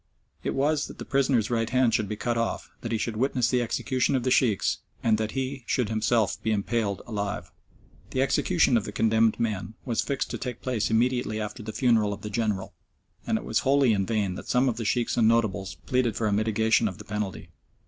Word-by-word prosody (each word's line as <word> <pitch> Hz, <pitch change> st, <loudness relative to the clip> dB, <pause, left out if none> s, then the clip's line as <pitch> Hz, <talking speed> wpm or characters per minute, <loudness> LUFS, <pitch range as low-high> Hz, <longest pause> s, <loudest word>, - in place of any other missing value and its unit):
It -, -, -2 dB
was 150 Hz, +2 st, +1 dB
that -, -, -11 dB
the -, -, -7 dB
prisoner's 130 Hz, -5 st, +1 dB
right 115 Hz, -1 st, 0 dB
hand 125 Hz, -2 st, +3 dB
should 105 Hz, -2 st, +1 dB
be 105 Hz, -, -2 dB
cut 120 Hz, +2 st, -1 dB
off, 115 Hz, 0 st, -2 dB
that 115 Hz, -, -4 dB
he 115 Hz, -, +1 dB
should 110 Hz, +1 st, -2 dB
witness 125 Hz, -1 st, +1 dB
the 125 Hz, -1 st, +2 dB
execution 130 Hz, +3 st, 0 dB
of 130 Hz, -, 0 dB
the 130 Hz, -, 0 dB
Sheikhs, 115 Hz, -7 st, +2 dB, 0.2 s
and 110 Hz, -2 st, +3 dB
that 110 Hz, -1 st, -2 dB
he 135 Hz, 0 st, -3 dB
should 125 Hz, -5 st, 0 dB
himself 110 Hz, 0 st, +1 dB
be 110 Hz, -, -1 dB
impaled 105 Hz, -1 st, -1 dB
alive. 105 Hz, -3 st, -4 dB, 0.6 s
The 130 Hz, -, +1 dB
execution 140 Hz, -2 st, +3 dB
of 105 Hz, -, -2 dB
the -, -, -5 dB
condemned 110 Hz, +1 st, +2 dB
men 105 Hz, -2 st, -2 dB
was 120 Hz, -4 st, 0 dB
fixed 140 Hz, -1 st, -2 dB
to -, -, -4 dB
take 125 Hz, -3 st, -5 dB
place 115 Hz, -5 st, 0 dB
immediately 120 Hz, -1 st, +1 dB
after 105 Hz, +2 st, -5 dB
the 110 Hz, +1 st, -6 dB
funeral 110 Hz, -4 st, +2 dB
of -, -, -9 dB
the 105 Hz, -, -6 dB
General, 105 Hz, -3 st, -1 dB, 0.5 s
and -, -, +2 dB
it -, -, -6 dB
was -, -, +1 dB
wholly 135 Hz, -3 st, +3 dB
in 100 Hz, -2 st, 0 dB
vain 105 Hz, -5 st, 0 dB
that -, -, -8 dB
some 125 Hz, +2 st, +3 dB
of 120 Hz, -3 st, 0 dB
the 115 Hz, -, -3 dB
Sheikhs 120 Hz, +2 st, 0 dB
and 115 Hz, -2 st, +4 dB
notables 105 Hz, -7 st, +1 dB
pleaded 125 Hz, -4 st, +1 dB
for 110 Hz, -, -1 dB
a 105 Hz, -, +1 dB
mitigation 110 Hz, +1 st, +2 dB
of 95 Hz, -4 st, -5 dB
the -, -, -11 dB
penalty. 105 Hz, -2 st, -4 dB
115 Hz, 220 wpm, -26 LUFS, 105-125 Hz, 0.6 s, and